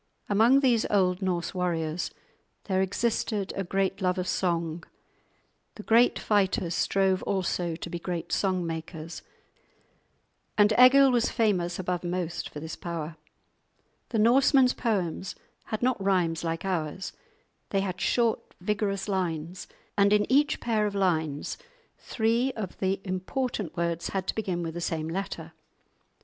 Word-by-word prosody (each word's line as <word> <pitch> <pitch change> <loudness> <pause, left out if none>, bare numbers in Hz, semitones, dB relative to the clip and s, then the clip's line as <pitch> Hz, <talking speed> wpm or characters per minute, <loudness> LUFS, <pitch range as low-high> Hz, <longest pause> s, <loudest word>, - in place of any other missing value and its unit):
Among 230 +7 +5
these 240 -5 +3
old 185 -2 +2
Norse 180 -3 -1
warriors 170 -2 -1 0.5
there 190 -2 0
existed 205 0 -1
a 195 - -1
great 195 +2 -1
love 180 -1 +1
of 185 0 -2
song; 170 -3 -1 0.9
the 210 - -9
great 235 +3 +4
fighters 190 -4 +1
strove 190 +1 +2
also 180 -3 -1
to 170 - -7
be 170 0 -5
great 170 -1 -4
song 185 -3 +1
makers, 160 0 -6 1.4
and 210 0 +5
Egil 270 +2 +8
was 240 -1 +2
famous 180 -6 +1
above 180 -1 -2
most 175 -1 -3
for 150 - -8
this 160 +1 -6
power. 165 -2 -5 0.9
The 230 - -1
Norsemen's 255 +3 +5
poems 190 -5 -2 0.3
had 215 +2 -4
not 250 -5 +1
rhymes 175 -4 +1
like 165 +2 -3
ours; 180 -1 -2 0.6
they 195 - +1
had 185 -2 -4
short 235 -2 0
vigorous 200 +1 -1
lines, 180 -3 -2 0.3
and 200 0 +4
in 210 0 +4
each 290 +2 +3
pair 215 -3 +1
of 200 - -5
lines 160 - 0 0.4
three 235 +3 +1
of 200 -5 -5
the 190 0 0
important 190 - -3
words 170 0 -1
had 190 -1 -2
to - - -1
begin 185 -5 -2
with 165 -1 -4
the 175 - -5
same 160 -2 -2
letter. 195 +4 -5
190 Hz, 140 wpm, -27 LUFS, 170-210 Hz, 1.4 s, Egil